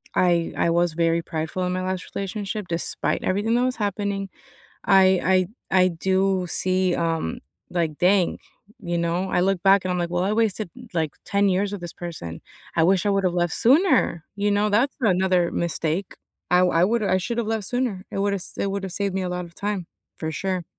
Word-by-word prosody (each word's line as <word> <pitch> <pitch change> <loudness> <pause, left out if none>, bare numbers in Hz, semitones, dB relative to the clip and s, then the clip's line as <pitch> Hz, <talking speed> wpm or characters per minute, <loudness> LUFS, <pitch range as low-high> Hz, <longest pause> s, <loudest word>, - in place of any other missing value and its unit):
I 175 -2 +2
I 170 - +2
was 175 0 +2
very 165 0 +1
prideful 160 +3 -3
in 180 - -1
my 185 - -2
last 185 0 -4
relationship, 200 0 -4
despite 170 0 -1
everything 205 +5 +1
that 245 - +2
was 255 -1 0
happening, 200 -1 -2 0.6
I 190 -1 +4 0.2
I 190 - +4
I - - +4
do 190 +1 0
see, 185 0 +2
um, 165 - -1 0.3
like 165 -4 -1
dang, 185 0 +3 0.4
you 175 -3 -2
know, 170 +3 -1
I 180 - +2
look 190 -1 +1
back 195 -1 +5
and 185 - 0
I'm 180 - -1
like, 170 -1 -1
well, 175 +1 0
I 205 - 0
wasted 215 -4 0 0.2
like 160 -3 0
10 200 0 +2
years 195 +2 0
with 195 -3 -6
this 170 - -5
person. 155 - -7 0.3
I 160 - +3
wish 185 +1 +3
I 205 - +2
would 195 -1 +1
have 180 -1 +1
left 175 -1 0
sooner, 260 - +3
you 205 0 0
know, 205 +1 +2
that's 240 +7 +2
another 185 -3 +2
mistake. 170 +2 -2 0.3
I 180 0 +5
I 180 -1 +3
woulda 215 -1 +1
I 185 - +3
should 235 +6 -3
have 230 - 0
left 220 -3 -2
sooner. 240 -6 -2
It - - -4
would 200 0 +1
have 195 - -2
s - - -9
it 200 - -1
would 200 0 -3
have 190 -2 -5
saved 200 -1 -1
me 190 - -1
a 180 - -2
lot 180 0 -3
of 170 0 -14
time, 200 -4 -3 0.3
for 160 -1 -4
sure. 185 +1 -2
185 Hz, 215 wpm, -24 LUFS, 175-200 Hz, 0.6 s, back